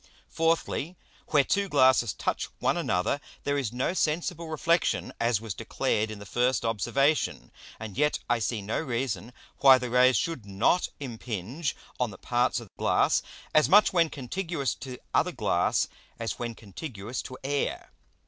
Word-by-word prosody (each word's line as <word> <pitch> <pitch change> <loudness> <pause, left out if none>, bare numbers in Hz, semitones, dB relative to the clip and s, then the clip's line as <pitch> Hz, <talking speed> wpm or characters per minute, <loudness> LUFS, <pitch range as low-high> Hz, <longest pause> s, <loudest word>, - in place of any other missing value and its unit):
Fourthly, 165 0 0 0.3
Where 145 -3 +4
two 200 +6 0
Glasses 130 - +4
touch - - -2
one - - +1
another, 90 +10 0 0.2
there 145 - 0
is 135 -6 -1
no 125 +8 -1
sensible 170 0 -1
Reflexion, 160 - +1
as 115 -2 +2
was 110 -2 -5
declared 110 +4 -1
in 110 - -6
the 100 - -10
first 125 +4 +1
Observation; 130 - +1 0.3
and 110 -3 -7
yet 150 +2 +2
I 120 -1 +2
see 110 -1 -2
no 105 - -1
reason 120 - -2 0.3
why 135 -1 +8
the 125 -2 -4
Rays 125 +1 +5
should 165 -8 -2
not 100 - +1
impinge 125 - -4 0.2
on 125 -2 +1
the 100 - -10
parts 125 +1 +1
of 115 -5 -13
Glass, - - +3 0.3
as 155 - +5
much 210 +1 +6
when 170 -3 +3
contiguous 150 +1 -3
to 130 -2 -7 0.2
other - - +3
Glass - - +1 0.3
as 115 -1 -4
when 120 -1 -4
contiguous 110 - -6
to 130 - -9
Air. 140 +1 -2
130 Hz, 160 wpm, -28 LUFS, 115-150 Hz, 0.3 s, why